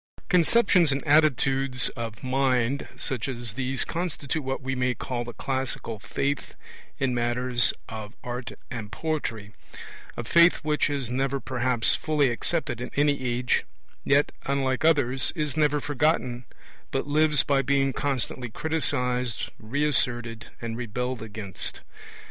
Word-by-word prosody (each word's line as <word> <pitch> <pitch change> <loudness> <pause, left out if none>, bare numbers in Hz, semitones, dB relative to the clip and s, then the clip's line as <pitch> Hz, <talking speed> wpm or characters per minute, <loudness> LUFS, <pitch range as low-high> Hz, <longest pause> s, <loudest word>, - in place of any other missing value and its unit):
Conceptions 180 -2 +4
and 135 +3 -2
attitudes 135 -4 +3
of 115 -1 -7
mind 130 0 +1
such 125 -2 -2
as 120 -4 -5
these 135 +1 +1
constitute 160 -3 -3
what 135 0 -2
we 135 +1 -2
may 125 -1 0
call 120 +2 -3
the 120 - -7
classical 130 -3 -3
faith 140 +6 -2 0.4
in 130 -2 0
matters 120 +1 +3 0.2
of 110 -2 -7
art 125 0 -5 0.2
and 110 -4 -6
poetry; 115 -10 -3 0.6
a 120 - -3
faith 170 +8 +6
which 150 0 +1
is 135 -5 -2
never 135 +2 0
perhaps 125 -2 +1
fully 150 -4 +2
accepted 120 -1 -1
in 125 - -4
any 145 -1 +2
age, 125 0 +1 0.4
yet, 145 +1 +3 0.2
unlike 135 0 0
others, 135 -6 +3
is 150 -4 -2
never 150 -1 +2
forgotten 140 -4 0 0.4
but - - -1
lives 150 +1 +3
by 140 -1 +2
being 135 0 +1
constantly 130 -3 -2
criticized, 125 -5 -1
re 135 +7 -1
asserted, 120 -5 +1
and 115 -1 -4
rebelled 125 +1 -3
against. 105 -4 -6
130 Hz, 135 wpm, -26 LUFS, 120-145 Hz, 0.6 s, faith